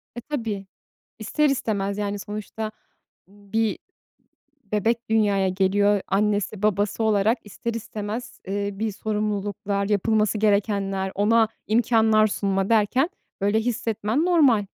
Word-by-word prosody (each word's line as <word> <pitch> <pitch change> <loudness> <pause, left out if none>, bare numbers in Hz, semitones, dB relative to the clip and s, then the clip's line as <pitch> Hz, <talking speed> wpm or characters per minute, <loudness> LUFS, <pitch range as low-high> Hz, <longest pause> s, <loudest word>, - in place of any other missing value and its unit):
E, 240 - -5
tabii, 225 -8 -4 0.5
ister 295 +7 +1
istemez. 205 -6 -1
Yani 205 0 -2
sonuçta 215 +1 -5 0.6
bir 205 +2 -2 0.9
bebek 225 +3 0
dünyaya 205 -3 +2
geliyor. 200 +2 +2
Annesi 205 0 0
babası 205 +1 +1
olarak 220 +2 +2
ister 230 +3 -5
istemez, 220 +1 -6
eee, 200 +1 -2
bir 215 +2 -3
sorumluluklar, 205 -1 -2
yapılması 215 +1 +1
gerekenler, 200 -2 +1
ona 220 +2 +3 0.2
imkânlar 220 -1 +4
sunma 195 -2 -1
derken 240 - +3 0.3
böyle 205 +3 +2
hissetmen 230 +2 -1
normal. 285 - +4
210 Hz, 110 wpm, -24 LUFS, 200-225 Hz, 0.9 s, imkânlar